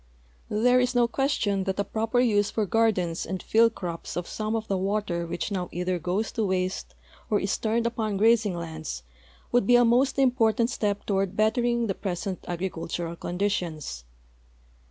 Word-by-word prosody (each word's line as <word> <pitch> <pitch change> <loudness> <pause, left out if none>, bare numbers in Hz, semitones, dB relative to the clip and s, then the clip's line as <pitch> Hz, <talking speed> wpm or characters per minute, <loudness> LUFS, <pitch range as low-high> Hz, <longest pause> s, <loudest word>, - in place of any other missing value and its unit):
There 245 +4 +4
is 250 0 +1
no 240 -1 +4
question 230 -7 0
that 190 0 -2
a 200 - +1
}u 220 0 0
oi)er 245 +2 +3
use 205 -2 +2
for 215 - -1
gardens 190 -6 +1
and 185 +1 -5
field 230 0 +4
cro[)S 170 -2 -5
of 175 - -3
some 215 +1 -2
of 220 -1 -3
the 195 - 0
water 190 -3 -1
which 175 - -3
now 180 -3 -2
either 180 +1 -1
goes 185 +7 -1
to 225 - -1
waste 185 -1 -2 0.3
or 210 -2 +3
is 195 - 0
turned 230 +1 0
upon 220 -3 -1
grazing 220 -2 +3
lands 160 - -6 0.5
would 240 -5 +3
be 245 - +6
a 245 0 +6
most 245 +4 +3
im])ortant 235 -4 +3
step 205 -4 -1
toward 195 -2 0
l)ettering 235 +2 +2
the 195 - 0
i)resent 190 0 -4
agricultural 175 -1 -3
conditions. 170 - -3
205 Hz, 175 wpm, -26 LUFS, 180-230 Hz, 0.5 s, be